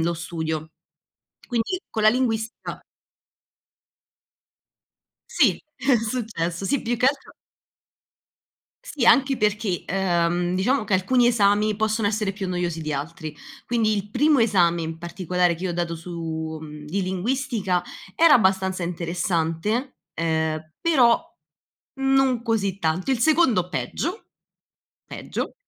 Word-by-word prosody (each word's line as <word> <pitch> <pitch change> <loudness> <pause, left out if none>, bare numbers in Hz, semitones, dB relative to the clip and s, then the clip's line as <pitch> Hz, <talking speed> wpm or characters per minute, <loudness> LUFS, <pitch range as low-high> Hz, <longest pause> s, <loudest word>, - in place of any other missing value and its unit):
lo 170 +1 +1
studio. 160 -2 -4 0.8
Quindi, 240 +9 -1
con 220 - -2
la 215 - +7
linguistica 225 -2 -1 2.5
Sì, - - +3
è 270 -1 +2
successo. 215 -7 -3
Sì, 275 +7 +1
più 240 0 -1
che 250 +3 +2
altro 275 0 -1 1.5
Sì, 300 - -2
anche 270 +1 +5
perché, 210 -4 0
ehm, 175 -1 0
diciamo 220 +6 +1
che 200 - 0
alcuni 240 +7 +3
esami 210 -2 +3
possono 220 0 0
essere 210 -2 -1
più 195 -1 -5
noiosi 175 -2 -2
di 155 -1 -3
altri. 155 +2 -5 0.3
Quindi, 225 -3 +1
il 205 0 -3
primo 290 +7 +3
esame 180 -7 +3
in 160 0 -5
particolare 180 0 0
che 180 - -7
io 185 - -1
ho - - -2
dato 170 -1 -2
su 160 -2 -5
mhmm, 150 -1 -9
di 190 +6 -2
linguistica 195 0 -1 0.3
era 330 +3 +6
abbastanza 190 -4 +2
interessante, 175 - -2 0.2
ehm, 160 -1 -1
però 290 -4 +4 0.8
non 270 -3 +2
così 205 -5 -1
tanto. 165 +6 -1
Il 260 - +2
secondo 250 - +3
peggio 345 - -3 0.8
peggio, - - -5
195 Hz, 125 wpm, -24 LUFS, 170-235 Hz, 2.5 s, la